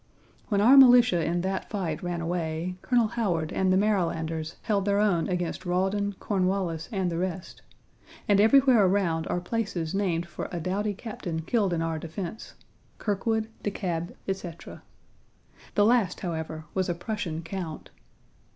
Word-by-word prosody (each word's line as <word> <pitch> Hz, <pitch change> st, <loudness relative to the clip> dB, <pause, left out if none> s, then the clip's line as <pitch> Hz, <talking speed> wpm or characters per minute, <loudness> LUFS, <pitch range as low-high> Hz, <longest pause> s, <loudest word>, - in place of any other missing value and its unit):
When 200 Hz, -2 st, +1 dB
our 255 Hz, +6 st, +7 dB
militia 245 Hz, -9 st, +7 dB
in 175 Hz, +1 st, 0 dB
that 190 Hz, +1 st, -3 dB
fight 170 Hz, -7 st, -3 dB
ran 175 Hz, -1 st, -3 dB
away, 165 Hz, 0 st, -2 dB
Colonel 240 Hz, -4 st, +2 dB
Howard 175 Hz, -9 st, -1 dB
and 190 Hz, -1 st, +2 dB
the 185 Hz, -, +4 dB
Marylanders 165 Hz, -5 st, 0 dB
held 200 Hz, -3 st, 0 dB
their 200 Hz, 0 st, +2 dB
own 200 Hz, -5 st, +2 dB
against 180 Hz, -2 st, -2 dB
Rawdon, 195 Hz, +3 st, 0 dB
Cornwallis, 185 Hz, -4 st, -1 dB
and 190 Hz, -4 st, -1 dB
the 165 Hz, -, -2 dB
rest, 185 Hz, 0 st, -4 dB, 0.7 s
and 205 Hz, -1 st, +5 dB
everywhere 250 Hz, 0 st, +6 dB
around 180 Hz, -4 st, +1 dB
are 175 Hz, -, -1 dB
places 175 Hz, -4 st, -3 dB
named 180 Hz, -4 st, 0 dB
for -, -, -6 dB
a 175 Hz, -, -3 dB
doughty 200 Hz, +5 st, -1 dB
captain 180 Hz, -7 st, -5 dB
killed 200 Hz, +1 st, +1 dB
in 165 Hz, -1 st, 0 dB
our 165 Hz, -1 st, -2 dB
defense 170 Hz, +6 st, -7 dB, 0.4 s
Kirkwood, 220 Hz, +1 st, -1 dB
De -, -, -1 dB
Kalb, 175 Hz, -4 st, -3 dB
etc. 185 Hz, -4 st, -6 dB, 0.9 s
The 205 Hz, -, +5 dB
last, 225 Hz, -6 st, +2 dB
however, 160 Hz, -2 st, -4 dB
was 185 Hz, -1 st, 0 dB
a 175 Hz, -, 0 dB
Prussian 170 Hz, -4 st, -4 dB
count. 165 Hz, -2 st, -6 dB
185 Hz, 150 wpm, -27 LUFS, 170-205 Hz, 0.9 s, our